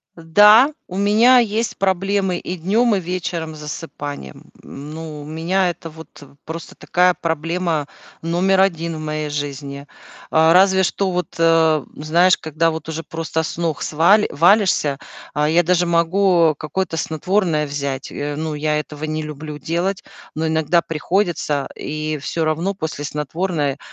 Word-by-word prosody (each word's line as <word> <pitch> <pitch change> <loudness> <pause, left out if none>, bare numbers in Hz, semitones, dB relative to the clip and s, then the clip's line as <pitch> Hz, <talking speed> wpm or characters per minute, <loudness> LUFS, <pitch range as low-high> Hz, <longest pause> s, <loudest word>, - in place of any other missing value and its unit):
Э, 165 - -12
да, 210 - +6 0.2
у 185 - -6
меня 220 +6 +5
есть 225 0 -1
проблемы 190 0 0
и 180 - -5
днем, 210 +6 +2
и - - 0
вечером 170 -3 -4
с - - -11
засыпанием. 145 - -8
М, 145 +2 -9
ну, 155 -2 -7
у - - -10
меня 170 +5 0
это 165 -1 -7
вот, 160 +1 -12
э, 145 - -13 0.2
просто 165 +1 -8
такая 180 0 +2
проблема 165 -1 -1 0.3
номер 185 +3 +2
1 170 -3 0
в - - -6
моей 155 -1 -3
жизни. 140 -1 -5 0.4
А, 160 +1 +5
разве 190 +1 +5
что 190 +1 0
вот, 180 -3 -3
э, 165 -2 +4
знаешь, 170 +5 +3
когда 160 +1 0
вот 160 0 -6
уже 160 +1 -4
просто 160 0 -3
с 160 - -5
ног 165 -4 -2
сва 165 +7 +4
валишься, 170 -5 +3 0.3
а, 150 0 +1
я 170 +2 +4
даже 175 +1 +2
могу 170 0 +3
какое-то 165 +3 -3
снотворное 160 0 0
взять. 140 -2 -4
Э, 145 0 -4
ну, 155 +1 -3
я 150 0 0
этого 150 0 -6
не 155 0 -3
люблю 150 0 -7
делать, 175 +5 -2 0.3
но 160 +1 -1
иногда 160 +2 +2
приходится. 165 -3 -1
И 155 0 -4
всё 160 +3 -2
равно 165 +5 -1
после 160 -5 -5
снотворной, 150 0 -2
165 Hz, 160 wpm, -20 LUFS, 150-180 Hz, 0.4 s, да